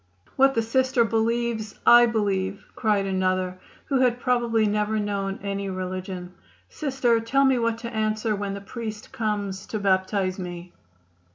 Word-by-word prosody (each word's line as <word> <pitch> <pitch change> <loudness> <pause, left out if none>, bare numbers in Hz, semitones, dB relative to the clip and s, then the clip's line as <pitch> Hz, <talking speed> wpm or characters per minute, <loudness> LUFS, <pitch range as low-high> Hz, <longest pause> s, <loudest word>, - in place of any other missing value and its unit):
"What 270 0 +4
the 230 - +2
Sister 260 +1 +2
believes, 225 -1 -1
I 240 0 +8
believe," 200 -3 -1
cried 210 -4 +1
another, 185 -1 0 0.3
who 270 -2 +1
had 250 -1 +2
probably 240 -3 +2
never 210 +1 0
known 200 -2 -2
any 200 0 -3
religion. 185 -1 -5 0.4
"Sister, 260 -6 +1
tell 270 +5 +2
me 265 -2 +3
what 230 -1 0
to 235 0 -7
answer 215 0 0
when 200 -1 -3
the 200 - -7
priest 215 +1 -7
comes 205 -3 -3
to 220 - -3
baptize 190 -1 +1
me." 175 -1 -7
215 Hz, 150 wpm, -25 LUFS, 195-235 Hz, 0.4 s, I